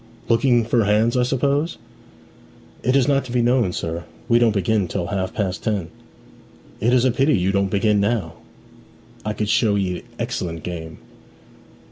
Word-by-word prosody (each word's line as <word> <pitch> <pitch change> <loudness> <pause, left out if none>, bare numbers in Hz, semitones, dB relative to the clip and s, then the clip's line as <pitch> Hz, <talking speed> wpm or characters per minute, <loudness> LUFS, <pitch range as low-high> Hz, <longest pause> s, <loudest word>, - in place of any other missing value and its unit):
'Looking 120 0 +3
for 115 -1 +2
hands, 110 +4 +2
I 125 - +3
suppose?' 140 +5 0 1.0
'It 125 +3 +1
is 135 -2 +3
not 140 -2 +2
to 125 - -8
be 120 -1 +1
known, 120 -5 +2
sir. 85 0 -4 0.2
We 120 0 +4
don't 120 -2 +4
begin 105 -1 +1
till 85 - -3
half 95 0 -2
past 95 -2 -3
ten.' 100 -7 -1 0.9
'It 120 - +2
is 125 0 +4
a 130 - +4
pity 135 +2 +2
you 95 +1 +1
don't 100 0 +1
begin 105 +1 +2
now. 100 -5 0 0.9
I 105 - -2
could 105 0 -2
show 105 -1 +2
'ee 90 -3 -2 0.2
excellent 95 -9 -4
game.' 80 -2 -6
110 Hz, 165 wpm, -21 LUFS, 95-120 Hz, 1.0 s, We